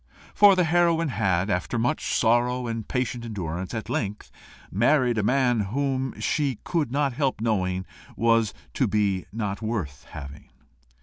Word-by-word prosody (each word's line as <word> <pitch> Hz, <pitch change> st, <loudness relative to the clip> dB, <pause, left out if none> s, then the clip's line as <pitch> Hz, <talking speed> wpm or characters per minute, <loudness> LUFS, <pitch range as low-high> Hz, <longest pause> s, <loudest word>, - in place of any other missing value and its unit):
For 205 Hz, -2 st, +7 dB
the 180 Hz, -, +3 dB
heroine 165 Hz, -1 st, +2 dB
had, 95 Hz, -4 st, 0 dB
after 90 Hz, +6 st, -1 dB
much 120 Hz, +7 st, 0 dB
sorrow 120 Hz, +2 st, +2 dB
and 115 Hz, -2 st, -4 dB
patient 125 Hz, -2 st, -2 dB
endurance, 90 Hz, -5 st, -4 dB
at 110 Hz, -1 st, -4 dB
length 105 Hz, -3 st, -3 dB, 0.4 s
married 120 Hz, +2 st, +3 dB
a -, -, +2 dB
man 125 Hz, +1 st, +2 dB
whom 130 Hz, +5 st, -1 dB
she 140 Hz, -6 st, 0 dB
could 160 Hz, -8 st, -1 dB
not 140 Hz, -1 st, +1 dB
help 135 Hz, -2 st, 0 dB
knowing 95 Hz, -5 st, 0 dB, 0.3 s
to 115 Hz, -2 st, +1 dB
be 100 Hz, -5 st, 0 dB
not 105 Hz, -1 st, -3 dB
worth 105 Hz, -12 st, -4 dB
having. 70 Hz, 0 st, -10 dB
115 Hz, 140 wpm, -25 LUFS, 100-130 Hz, 0.4 s, For